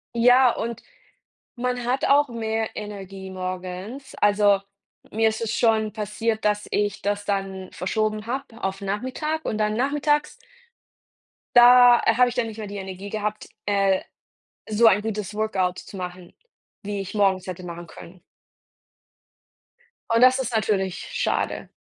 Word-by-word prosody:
Ja, 245 +2 +6
und 235 +1 -5 0.7
man 250 0 -2
hat 255 +2 0
auch 290 +1 +4
mehr 225 -2 -2
Energie 195 -2 -7
morgens. 185 +8 -6
Also, 205 -1 +4 0.5
mir 225 +1 +2
ist 220 - -5
es 225 0 -2
schon 220 -2 +2
passiert, 220 +1 -2
dass 210 0 +1
ich 205 -1 -1
das 205 0 -2
dann 195 -2 -3
verschoben 215 +3 -2
habe 250 -1 -5
auf 195 +1 -2
Nachmittag 260 +10 -3
und - - -1
dann 215 0 +1
nachmittags 295 +4 +1 1.2
da 245 0 +8 0.2
habe 250 0 +5
ich - - -7
dann 240 -2 0
nicht 220 -1 -8
mehr 215 -2 -6
die 200 0 -7
Energie 190 +1 -7
gehabt, 215 0 -4 0.2
äh, 195 -2 +2 0.7
so 220 +2 +5
ein 205 -1 +5
gutes 210 -2 -4
Workout 195 -4 -1
zu - - -12
machen, 180 -1 -7 0.5
wie 205 0 -4
ich 190 - -7
morgens 195 -3 +1
hätte 185 0 -6
machen 170 0 -8
können. 175 +2 -13 1.9
Und 230 +1 +3
das 255 +1 +6
ist 250 -2 -3
natürlich 195 -4 -1
schade. - - -1
215 Hz, 145 wpm, -24 LUFS, 195-235 Hz, 1.9 s, da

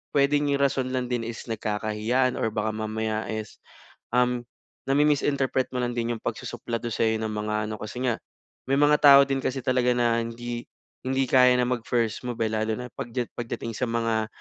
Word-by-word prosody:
pwedeng 145 +1 +3
'yong 140 0 +1
rason 135 -2 +1
lang 125 -1 -1
din 120 -2 -1
is 115 -1 -6
nagkakahiyaan 110 +4 0
or - - +1
baka 110 0 -1
mamaya 110 0 -2
is, 110 -1 -5 0.6
um, 125 -1 +2 0.5
nami-misinterpret 140 -2 +2
mo - - 0
lang 120 0 -1
din 120 0 -1
'yong - - -9
pagsusuplado 120 0 -4
sa'yo 110 0 +1
ng 110 - -2
mga 105 0 -2
ano, 110 - -3
kasi 110 +4 -5
nga 120 -3 0 0.5
may 135 - +2
mga 145 0 +5
tao 140 -1 +9
din 135 0 -1
kasi 130 0 -1
talaga 125 -1 +2
na 120 -1 +2
hindi 120 +1 -5 0.4
hindi 135 +1 +1
kaya 125 -1 +6
na 125 -1 +2
mag 125 -2 -1
first 115 -1 0
move, 120 -1 -4
eh, 110 - 0
lalo 110 0 0
na 125 0 -6
pagdyat 120 0 -4
pagdating 115 -1 -4
sa 125 - -1
mga 115 -1 0
120 Hz, 185 wpm, -26 LUFS, 110-130 Hz, 0.6 s, tao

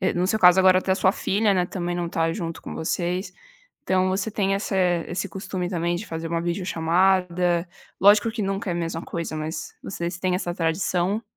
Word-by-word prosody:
no 180 +1 +1
seu 220 - +1
caso 180 -1 +7
agora 185 -1 +6
até 190 - -2
a - - +3
sua 190 -1 +3
filha, 205 +1 +1
né, 180 -2 +1
também 175 -1 -3
não 175 -1 -2
está 165 -1 0
junto 165 -4 -5
com - - -7
vocês, 180 +3 -2 0.5
então 185 0 +2
você 190 +3 -1
tem 195 -2 0
essa 200 0 -3 0.3
esse 185 +2 -3
costume 185 0 -4
também 170 -1 -1
de 200 - -5
fazer 165 0 -4
uma 165 0 -1
videochamada, 175 0 +1 0.3
lógico 205 +3 +6
que 225 0 -4
nunca 195 0 -2
é - - -1
a - - -3
mesma 165 -1 -3
coisa, 170 -2 -5
mas 155 +1 -5
vocês 175 -1 -4
têm 185 -1 0
essa 175 -2 -3
tradição? 180 +5 0
180 Hz, 200 wpm, -24 LUFS, 170-190 Hz, 0.5 s, caso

